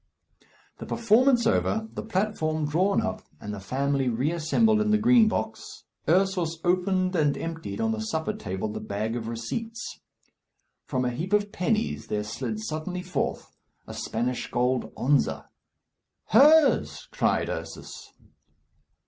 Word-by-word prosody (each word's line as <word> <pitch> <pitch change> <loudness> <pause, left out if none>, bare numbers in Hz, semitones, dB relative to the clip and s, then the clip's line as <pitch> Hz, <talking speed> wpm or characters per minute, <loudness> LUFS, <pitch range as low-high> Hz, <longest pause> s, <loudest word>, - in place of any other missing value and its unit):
The - - -7
performance 235 +2 +3
over, 220 -1 +1
the - - -4
platform 185 -7 -1
drawn 185 +7 +2
up, - - -3 0.2
and 105 - -6
the 100 - -6
family 135 +5 0
reassembled 165 - +2
in 215 - +1
the 215 - +4
Green 230 +1 +5
Box, - - -4 0.3
Ursus 180 -3 +2
opened 185 +1 +1
and 150 -4 +2
emptied 165 +4 -5
on 225 0 +1
the 225 - -2
supper 215 -3 -2
table 110 - -4
the 105 - -5
bag 110 +3 -3
of 115 -2 -4
receipts. 225 - -5 0.9
From 130 -2 -1
a 125 - 0
heap 170 +11 -4
of 205 0 +2
pennies 220 +3 -1
there 105 0 -1
slid 160 - -4
suddenly 180 +1 -4
forth 180 - -3 0.3
a - - -9
Spanish 120 +2 -2
gold 125 +1 0
onza. 140 +1 +1 0.8
"Hers!" 295 +6 +5
cried - - +1
Ursus. - - -7
180 Hz, 135 wpm, -26 LUFS, 130-215 Hz, 0.9 s, Green